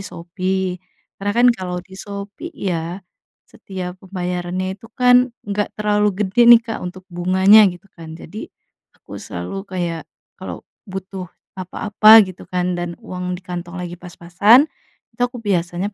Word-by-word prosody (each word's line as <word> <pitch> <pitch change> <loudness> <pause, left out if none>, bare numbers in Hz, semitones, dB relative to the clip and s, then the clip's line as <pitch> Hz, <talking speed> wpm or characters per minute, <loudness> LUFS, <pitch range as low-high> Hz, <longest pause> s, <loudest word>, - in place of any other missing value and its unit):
Shopee, 185 +1 -3 0.4
karena 205 +1 -1
kan 245 - +5
kalau 185 -5 -5
di 190 - -21
Shopee 205 +10 -7
ya, 175 0 -3 0.4
setiap 185 -1 -8
pembayarannya 180 0 -3
itu 200 +4 -13
kan 250 0 +5 0.2
enggak 205 0 -1
terlalu 210 0 +2 0.2
gede 195 +6 0 0.2
nih - - 0
Kak 225 -1 -4
untuk 180 +1 -7
bunganya 190 +4 +5
gitu 175 +1 -9
kan 165 -1 -11
jadi, 210 +5 -9 0.5
aku - - -11
selalu 90 - -6
kayak 175 -3 -3 0.4
kalau - - -7 0.2
butuh 190 -1 -6 0.3
apa-apa 210 +3 +1 0.2
gitu 185 -1 -11
kan 180 0 -1
dan 175 -1 -4
uang 180 0 -4
di 185 - -15
kantong 175 0 -6
lagi 175 -1 -6
pas-pasan, 180 +8 +4 0.5
itu 245 - -4 0.2
biasanya 175 0 0
185 Hz, 140 wpm, -20 LUFS, 175-200 Hz, 0.5 s, kan